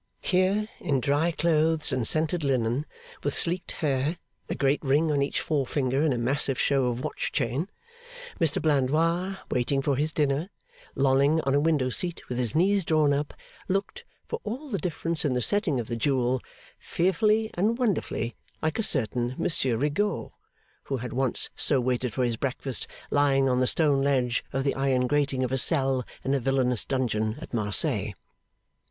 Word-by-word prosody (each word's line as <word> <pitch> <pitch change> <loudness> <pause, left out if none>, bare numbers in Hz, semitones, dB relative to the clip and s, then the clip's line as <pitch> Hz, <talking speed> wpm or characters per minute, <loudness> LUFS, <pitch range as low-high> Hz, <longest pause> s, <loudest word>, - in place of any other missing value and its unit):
Here, 190 +3 +1
in 145 -6 0
dry 145 +6 +1
clothes 160 -1 +1
and 125 -3 +1
scented 160 +1 +1
linen, 130 +1 0 0.4
with 145 - -1
sleeked 175 +1 +1
hair, 145 +3 0 0.3
a - - -2
great 140 +1 +1
ring 150 +3 +2
on 145 -1 +1
each 140 - -1
forefinger 135 -2 0
and 155 -1 +2
a 125 - 0
massive 135 +2 +1
show 135 -2 +2
of 125 +1 -2
watch 155 - -3
chain, 140 - -1 0.7
Mr 160 -3 +2
Blandois 165 +6 +1
waiting 125 +2 +1
for 135 0 0
his 150 +4 +1
dinner, 150 +3 0 0.5
lolling 140 +3 +3
on 135 -2 0
a 140 - +4
window 145 -4 +1
seat 175 +5 -2
with 125 0 -3
his 120 0 0
knees 195 +4 +3
drawn 155 -3 +2
up, 145 +1 -2 0.3
looked 200 - -2 0.2
(for - - -4
all 260 +8 -5
the 200 - -1
difference 165 -2 -1
in 145 - +1
the 125 - 0
setting 205 - +2
of 120 - -3
the 120 - -4
jewel) 125 0 0 0.4
fearfully 215 +5 +1
and 215 +6 +1
wonderfully 205 - -1 0.3
like 155 +4 -2
a - - +3
certain 125 - 0
Monsieur 130 -7 +1
Rigaud 150 - -1 0.5
who 135 - -2
had 125 0 -6
once 130 -1 0
so 140 - +3
waited 125 0 -1
for 130 - -1
his 120 -2 0
breakfast, 135 -1 -3 0.2
lying 140 -2 +3
on 125 -1 +2
the 130 - +2
stone 145 -3 +3
ledge 130 -4 +1
of 135 0 -1
the 140 - +1
iron 135 -2 +1
grating 140 -1 0
of 125 - -2
a 135 - +2
cell 135 -3 +3 0.2
in 135 - 0
a 140 - +2
villainous 125 -2 +1
dungeon 110 -4 -1
at - - -10
Marseilles. 105 -3 0
140 Hz, 175 wpm, -26 LUFS, 130-160 Hz, 0.7 s, a